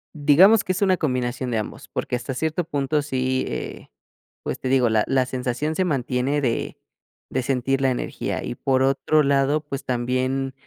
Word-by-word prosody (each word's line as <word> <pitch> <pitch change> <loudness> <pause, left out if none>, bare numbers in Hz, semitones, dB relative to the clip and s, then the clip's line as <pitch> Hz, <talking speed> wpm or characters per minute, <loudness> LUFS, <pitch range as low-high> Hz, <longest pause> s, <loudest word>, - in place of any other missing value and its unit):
Digamos 165 +9 +6
que 185 - -1
es 190 - -1
una 185 -2 +3
combinación 125 -3 -1
de 115 - 0
ambos, 110 - -5
porque, - - -3
hasta 130 +1 -4
cierto 160 +4 -1
punto 145 0 0
sí, 130 -2 -1
eh, - - -6 0.6
pues, - - -4
te - - -4
digo, 130 -2 +4
la 110 -1 +3
la 130 -1 +2
sensación 130 +4 -2
se 185 - +1
mantiene 135 -1 0
de 120 -4 -2 0.5
de 130 - 0
sentir 135 +1 0
la 135 - +3
energía. 125 - -3
Y, - - -4
por 130 +1 +1
otro 150 +3 +2
lado, 140 +2 +2
pues, 140 -1 -6
también, 130 +2 -1
135 Hz, 180 wpm, -23 LUFS, 125-150 Hz, 0.6 s, Digamos